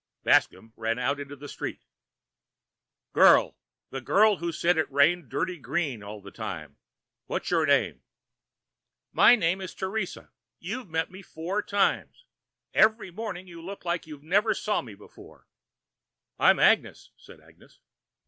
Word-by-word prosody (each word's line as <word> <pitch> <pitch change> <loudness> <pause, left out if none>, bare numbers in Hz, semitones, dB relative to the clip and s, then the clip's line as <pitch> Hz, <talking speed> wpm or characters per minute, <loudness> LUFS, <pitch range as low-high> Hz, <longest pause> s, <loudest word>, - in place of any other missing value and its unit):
Bascomb 110 0 +2
ran 115 +1 -2
out 135 +3 -1
into 145 0 -7
the 145 +1 -10
street. - - -6 1.3
"Girl, - - +6 0.4
the 135 - -5
girl 210 - +4
who 170 0 -3
said 170 +2 +1
it 155 - -1
rained 145 +2 +3
dirty 180 +5 -2
green 140 -2 -2
all 105 0 -9
the 100 0 -12
time, 80 -10 -7 0.5
what's - - -3
your - - +2
name?" - - +2 1.1
"My 245 - +7
name 185 -3 0
is 185 - -7
Teresa. 190 0 -4 0.3
You've 215 +4 -6
met 160 +1 -2
me 190 +1 -11
four 185 +3 -4
times. 205 - -1 0.5
Every 220 -3 +3
morning 200 -2 -6
you 170 -2 -11
look 190 +2 -9
like 170 -2 -2
you 150 -2 -9
never 205 +7 +2
saw 210 - -1
me 110 -6 -11
before." 105 - -17 0.9
"I'm - - +5
Agnes," - - +2
said - - -16
Agnes. - - -22
170 Hz, 145 wpm, -27 LUFS, 135-195 Hz, 1.3 s, My